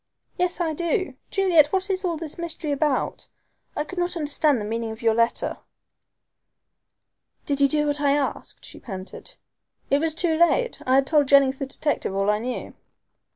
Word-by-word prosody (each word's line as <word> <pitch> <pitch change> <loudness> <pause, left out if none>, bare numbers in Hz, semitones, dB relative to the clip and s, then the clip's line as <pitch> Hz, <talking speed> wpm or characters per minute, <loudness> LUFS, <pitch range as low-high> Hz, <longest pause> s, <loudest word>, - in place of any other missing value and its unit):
"Yes 360 0 -1
I 330 -2 0
do. 340 -1 -1 0.2
Juliet, 360 -7 +4
what 380 0 0
is 375 0 +1
all 345 -3 -1
this 320 0 -5
mystery 335 -2 -4
about? 285 -1 -1 0.5
I - - -1
could 360 +4 -7
not 350 0 -1
understand 295 -3 +2
the 210 - -4
meaning 225 +1 -3
of 220 +1 -8
your 225 -1 +4
letter." 230 +1 0 1.9
"Did 285 -2 -1
you 280 - +6
do 300 +1 +1
what 290 0 0
I 280 -1 +3
asked?" 285 -1 -3
she - - -11
panted. 195 - -8 0.5
"It 280 - +4
was 320 0 -1
too 330 -1 +1
late. 345 +9 +2
I 260 - +4
had 270 0 +4
told 295 -1 +3
Jennings 275 -1 +4
the 275 - -3
detective 280 -7 -1
all 195 +1 +2
I 210 - 0
knew." 250 +2 -5
295 Hz, 180 wpm, -24 LUFS, 265-340 Hz, 1.9 s, you